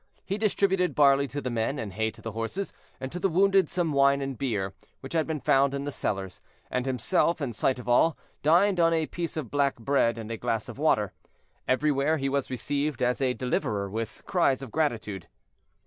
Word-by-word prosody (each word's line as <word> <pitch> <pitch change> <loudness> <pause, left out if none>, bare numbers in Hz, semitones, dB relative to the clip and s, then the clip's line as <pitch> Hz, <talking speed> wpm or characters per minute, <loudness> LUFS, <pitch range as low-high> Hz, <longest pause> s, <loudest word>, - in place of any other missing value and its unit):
He 200 +2 -2
distributed 195 -3 +1
barley 140 -1 +5
to 145 +2 -5
the 125 - -3
men, 115 +5 -1
and 105 -6 -5
hay 110 +2 0
to 110 0 -15
the 115 - -4
horses, 115 - -4 0.3
and 130 0 -5
to 180 - -5
the 195 - +1
wounded 195 +2 +3
some 175 -3 -1
wine 140 0 +4
and 135 -1 -3
beer, 105 -7 -2 0.3
which 135 - -8
had 160 -1 +1
been 160 -2 -2
found 135 +1 +3
in 140 - -3
the 145 - -3
cellars, 95 -7 -3 0.3
and 125 +1 -1
himself, 165 +6 +1
in 135 -5 -3
sight 130 +4 +1
of 125 - -9
all, 145 +7 +4 0.2
dined 175 +5 +4
on 165 0 +4
a 160 -1 +1
piece 170 +1 -5
of 145 -7 -4
black 140 -1 +2
bread 115 -1 +2
and 115 0 -6
a 115 - -3
glass 110 0 -2
of - - -9
water. - - +2 0.5
Everywhere 145 +3 +2
he 135 -1 -1
was 140 -1 -1
received 140 +3 -2
as 125 +2 +1
a 130 -2 +1
deliverer 105 -6 -1
with 110 +1 -5
cries 140 -8 +1
of 130 - -8
gratitude. 110 - -2
140 Hz, 210 wpm, -27 LUFS, 115-160 Hz, 0.5 s, barley